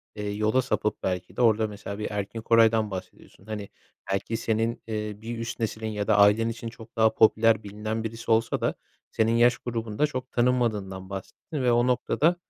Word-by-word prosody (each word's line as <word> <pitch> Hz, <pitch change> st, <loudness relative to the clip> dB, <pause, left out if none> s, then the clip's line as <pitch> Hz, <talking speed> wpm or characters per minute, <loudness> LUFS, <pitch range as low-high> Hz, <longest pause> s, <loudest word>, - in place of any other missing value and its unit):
eee, 105 Hz, -1 st, -4 dB
yola 110 Hz, +5 st, +2 dB
sapıp 115 Hz, -4 st, -2 dB
belki 90 Hz, -1 st, -3 dB
de -, -, -1 dB
orada 110 Hz, -2 st, +4 dB
mesela 100 Hz, 0 st, -7 dB
bir 105 Hz, -, -3 dB
Erkin 105 Hz, +2 st, -4 dB
Koray'dan 115 Hz, -2 st, +4 dB
bahsediyorsun. 95 Hz, 0 st, -9 dB
Hani, 105 Hz, -2 st, -6 dB, 0.4 s
belki 105 Hz, +3 st, -1 dB
senin, 115 Hz, +1 st, -1 dB
eee, 105 Hz, -1 st, -3 dB
bir 115 Hz, +1 st, -5 dB
üst 115 Hz, +1 st, -5 dB
nesilin 110 Hz, -1 st, -2 dB
ya 105 Hz, -1 st, -3 dB
da -, -, +4 dB
ailen 105 Hz, +3 st, +5 dB
için 115 Hz, 0 st, -5 dB
çok 115 Hz, 0 st, -14 dB
daha 110 Hz, -1 st, +4 dB
popüler, 110 Hz, 0 st, +4 dB
bilinen 105 Hz, +2 st, -4 dB
birisi 115 Hz, +1 st, -4 dB
olsa 110 Hz, 0 st, +2 dB
da -, -, 0 dB, 0.4 s
senin 110 Hz, 0 st, +2 dB
yaş 120 Hz, +1 st, +5 dB
grubunda 115 Hz, +3 st, -1 dB
çok 130 Hz, -2 st, -6 dB
tanınmadığından 110 Hz, -7 st, 0 dB
bahsettin 100 Hz, -, -6 dB
ve 125 Hz, -, +4 dB
o 120 Hz, +1 st, +3 dB
noktada, 155 Hz, +6 st, +2 dB
110 Hz, 180 wpm, -26 LUFS, 105-115 Hz, 0.4 s, ailen